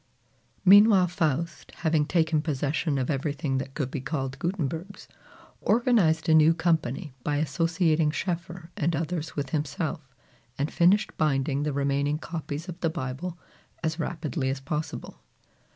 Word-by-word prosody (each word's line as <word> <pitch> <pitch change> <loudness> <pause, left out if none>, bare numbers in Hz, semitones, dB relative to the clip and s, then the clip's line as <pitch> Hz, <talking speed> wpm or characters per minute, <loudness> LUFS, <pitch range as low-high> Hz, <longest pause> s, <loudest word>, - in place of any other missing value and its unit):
Meanwhile 200 -1 +7
Faust, 165 -2 -2
having 155 -3 +2
taken 160 -3 +2
possession 145 0 -1
of 130 +2 0
everything 140 -1 -1
that 135 0 -7
could 135 -4 -2
be 140 - -3
called 135 -1 -3
Gutenberg's, 175 +2 -3 0.5
organized 210 -9 +3
a 160 - +5
new 160 +1 +6
company 160 -3 0
by 145 - 0
associating 165 0 +1
Schoeffer 175 +1 -4
and 165 +2 0
others 160 0 -3
with 140 -3 -3
himself, 150 -1 -3 0.4
and 140 +2 -2
finished 195 +5 +3
binding 140 -2 +1
the 150 0 0
remaining 140 +1 0
copies 160 0 -5
of 175 -2 -7
the 165 - +1
Bible 165 +3 -4 0.5
as 160 +1 -1
rapidly 155 -5 -2
as 135 0 -2
possible. 150 +3 -5
155 Hz, 135 wpm, -27 LUFS, 140-170 Hz, 0.5 s, Meanwhile